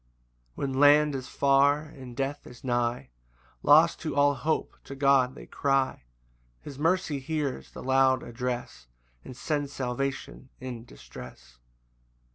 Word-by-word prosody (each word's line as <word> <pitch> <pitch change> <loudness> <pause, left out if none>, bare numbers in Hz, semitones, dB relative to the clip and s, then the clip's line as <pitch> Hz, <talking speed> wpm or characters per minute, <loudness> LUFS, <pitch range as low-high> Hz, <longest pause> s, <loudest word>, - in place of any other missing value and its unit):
4 - - -5
When 135 -1 -2
land 145 +1 +6
is 130 -1 -5
far, 140 +2 +3
and 130 -6 -11
death 140 +2 -3
is 125 - -14
nigh, 120 - -1 0.5
Lost 160 +3 +5
to 155 -4 -4
all 145 0 +4
hope, 155 +3 -2
to 135 - -8
God 135 -2 +3
they - - -11
cry; 135 - 0 0.6
His 140 -2 -9
mercy 165 -2 +1
hears 145 -1 -3
the - - -10
loud 130 0 +3
address, 120 - -5 0.4
And 125 - -10
sends 145 -1 -2
salvation 135 0 -4
in 125 -3 -7
distress. - - -13
135 Hz, 135 wpm, -27 LUFS, 125-145 Hz, 0.6 s, land